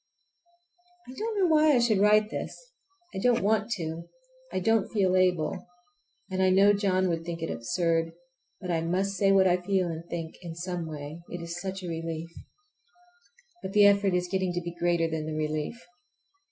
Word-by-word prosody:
I 255 - -9
don't 440 +4 -3
know 380 - +4
why 310 -3 +4
I - - +5
should 230 -4 +2
write 210 +1 +4
this. - - -5 0.6
I - - -4
don't 240 +1 +2
want 215 +1 +1
to. 165 -3 -5 0.4
I - - -1
don't 225 +2 +1
feel 190 -4 +2
able. 180 +2 +1 0.6
And 190 0 -1
I 190 - +4
know 195 +2 +5
John 190 -2 +1
would 165 -1 -2
think 170 -1 -5
it 165 - -2
absurd. 165 +5 -1 0.5
But 180 - -4
I 165 -1 0
must 185 +4 0
say 195 0 +2
what 195 -1 +5
I 180 -1 +4
feel 185 0 0
and 165 0 -5
think 165 -2 -5
in 170 -2 -7
some 175 -1 -4
way—it 155 +3 -8
is 170 +1 -6
such 190 0 -5
a - - -5
relief! 165 0 -5 1.3
But 190 - -6
the 205 -1 +6
effort 200 -2 +4
is 180 0 0
getting 190 -1 -1
to 175 - -2
be 170 0 -6
greater 170 -1 +1
than 160 -1 -4
the 155 - -4
relief. 155 +7 -3
180 Hz, 185 wpm, -28 LUFS, 165-200 Hz, 1.3 s, the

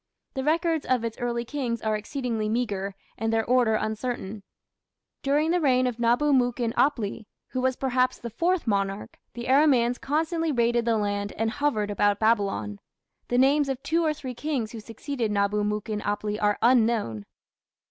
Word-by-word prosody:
The 265 - -3
records 325 +1 +1
of 250 -2 +1
its 230 -1 -4
early 240 -1 -2
kings 245 -3 -2
are 215 0 0
exceedingly 220 0 -3
meagre 200 -4 -2 0.2
and 225 +1 0
their 225 -1 +1
order 245 -3 +3
uncertain. 215 -1 -3 0.8
During 295 +4 +2
the 355 0 +2
reign 255 -3 +3
of 245 -2 -2
Nabu 245 +5 +3
mukin 245 -2 +1
apli, 225 -6 0 0.2
who 255 - -2
was 260 0 +1
perhaps 255 -1 +1
the 235 - -7
fourth 350 - 0
monarch, 200 -2 -2 0.2
the 240 - -5
Aramaeans 260 -3 +3
constantly 320 +3 0
raided 235 -2 +2
the 230 -1 +2
land 205 -1 -2
and 225 0 -1
hovered 225 -7 0
about 205 0 +2
Babylon. 210 -2 +1 0.5
The 245 - 0
names 275 +2 +4
of 270 -1 -3
two 335 +2 +1
or 315 - +2
three 260 -4 -6
kings 250 -4 -2
who 230 - -7
succeeded 225 +1 -4
Nabu 205 +1 +1
mukin 210 0 -2
apli 205 +1 -2
are 205 -1 +2
unknown. 225 - +2
235 Hz, 170 wpm, -26 LUFS, 215-265 Hz, 0.8 s, names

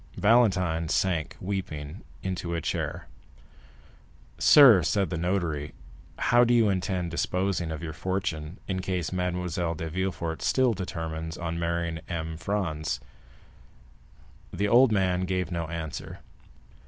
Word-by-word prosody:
Valentine 90 -8 +3
sank 85 -4 0
weeping 90 -4 -5 0.2
into 90 -2 -3
a - - 0
chair. - - -3 1.3
"Sir," 125 -10 +8
said 95 +1 0
the - - -1
notary, 85 -5 -1 0.4
"how 120 +1 +4
do 120 0 +3
you 115 -3 +4
intend 95 -2 -1
disposing 90 0 -1
of 80 +1 -5
your 80 -1 -5
fortune 85 -1 -3
in 95 -1 -2
case 90 -2 -2
Mademoiselle 90 -2 -1
de 80 0 -5
Villefort 85 -2 -3
still 130 -3 +3
determines 80 -4 -5
on 85 -1 -3
marrying 85 -1 -1
M. 80 -2 -3
Franz?" 80 -3 -2 1.5
The 100 +2 -1
old 120 +3 +6
man 95 -3 +1
gave 90 -1 -2
no 85 -1 -2
answer. 80 -2 -6
90 Hz, 125 wpm, -27 LUFS, 80-95 Hz, 1.5 s, Sir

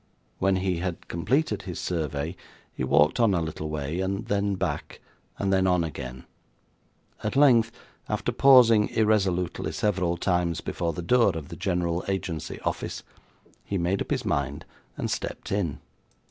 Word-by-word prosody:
When 95 0 +3
he 95 -1 0
had 90 -1 -4
completed 105 - 0
his 90 -3 -6
survey 80 -1 -2 0.4
he - - -4
walked 75 +8 +3
on 110 -5 +4
a - - +2
little 80 -1 -4
way, 75 +2 -3
and 95 +3 -2
then 100 -1 0
back, - - -3 0.4
and 95 -1 0
then 95 0 +3
on 90 -2 +3
again; 65 -5 -6 1.0
at 105 - -2
length, 120 -5 +5 0.4
after - - -1
pausing 120 -6 +6
irresolutely 100 -5 +1
several 90 -5 0
times 90 -2 0
before 85 -1 -2
the 85 - -5
door 105 -3 +3
of 75 -3 -7
the - - -7
General 90 -2 -1
Agency 95 -5 -3
Office, - - -3 0.6
he 100 - -2
made 90 +3 0
up - - -3
his - - -1
mind, 70 -1 -1 0.3
and - - -2
stepped - - -4
in. 95 -7 -1
90 Hz, 155 wpm, -26 LUFS, 85-100 Hz, 1.0 s, pausing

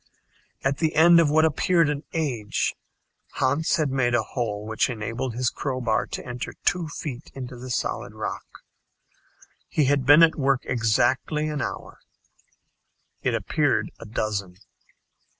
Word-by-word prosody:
At 135 +1 0
the 160 -1 0
end 170 +2 +7
of 165 -3 +4
what 160 +2 +4
appeared 165 +2 +2
an 145 0 -2
age, 125 -10 -1 0.6
Hans 145 +7 +1
had 155 -6 0
made 120 -2 +1
a 115 - +2
hole 105 -3 -3
which 110 +4 0
enabled 115 +1 -4
his 125 0 0
crowbar 130 -5 -1
to - - -6
enter 125 0 -5
two 175 -2 +1
feet 145 -3 -7
into 130 -1 -7
the 125 +1 -9
solid 125 - -3
rock. - - -6 1.0
He 150 - +1
had 140 0 +2
been 145 +5 +7
at 165 - +5
work 135 -2 +2
exactly 125 +6 +1
an 150 -2 -3
hour. - - -6 1.2
It - - 0
appeared - - 0
a - - -9
dozen. 100 -4 -3
130 Hz, 145 wpm, -25 LUFS, 120-150 Hz, 1.2 s, end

